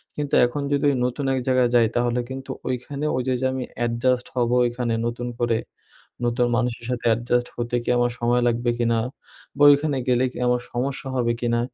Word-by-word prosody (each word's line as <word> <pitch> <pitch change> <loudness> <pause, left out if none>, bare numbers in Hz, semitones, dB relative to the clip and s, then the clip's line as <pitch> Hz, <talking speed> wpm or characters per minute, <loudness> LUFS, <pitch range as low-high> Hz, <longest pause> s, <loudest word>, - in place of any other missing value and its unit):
কিন্তু 145 -1 -1
এখন 125 +4 -3
যদি 140 +1 +1
ওই - - -1
নতুন 125 +3 -2
এক 130 - 0
জায়গা 130 -1 +3
যাই, 115 -2 +5
তাহলে 120 0 +1
কিন্তু 135 0 -6 0.2
ওইখানে 130 +4 -3
ওই 130 - 0
যে, 130 - +2
যে - - 0
আমি 130 - -3
অ্যাডজাস্ট 120 +1 0
হব 120 -2 +1
ওইখানে 120 -1 -1
নতুন 120 +1 -4
করে, 120 -1 +2 0.7
নতুন 120 +1 +1
মানুষের 120 -1 -1
সাথে 125 -1 -3
অ্যাডজাস্ট 120 +2 +1
হতে 120 0 -3
কি - - -9
আমার 120 0 +2
সময় 120 +1 +2
লাগবে 120 +1 0
কিনা? 115 -1 +1 0.6
বা 145 - +5
ওইখানে 145 0 +3
গেলে 125 0 +3
কি - - -9
আমার 125 0 +2
সমস্যা 135 +2 -2
হবে 120 -2 +1
কিনা? 120 -1 +1
120 Hz, 195 wpm, -23 LUFS, 120-130 Hz, 0.7 s, যাই